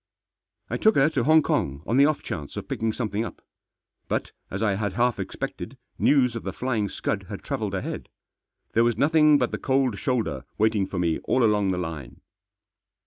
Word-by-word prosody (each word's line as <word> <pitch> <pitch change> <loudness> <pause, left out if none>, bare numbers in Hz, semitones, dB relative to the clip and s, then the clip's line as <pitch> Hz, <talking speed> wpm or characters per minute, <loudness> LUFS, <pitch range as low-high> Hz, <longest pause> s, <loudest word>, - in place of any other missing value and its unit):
I - - -2
took 220 0 +4
her 140 +3 +4
to 130 -6 0
Hong 155 +1 +6
Kong 70 - -1
on 120 - +1
the 140 +1 +7
off 155 -2 -1
chance 75 -4 -6
of - - -5
picking 115 0 -1
something 110 -2 -2
up. 115 - -7 0.7
But, - - -2 0.2
as 95 +3 -3
I 105 -2 +2
had 100 -1 -2
half 120 +1 +1
expected, 95 - -5 0.2
news 125 -5 +3
of 115 - -3
The - - -4
Flying 115 -5 -1
Scud - - -3
had - - -7
travelled - - -2
ahead. - - -5 0.6
There 115 - +4
was 120 -2 +1
nothing 150 +2 +5
but 125 -3 0
the - - -3
cold 130 -6 +1
shoulder 125 +2 -1
waiting 110 -2 +2
for 95 - -5
me 85 -2 +1
all 130 - +2
along 105 -3 +3
the 90 - 0
line. 80 -7 -6
115 Hz, 195 wpm, -25 LUFS, 100-130 Hz, 0.7 s, the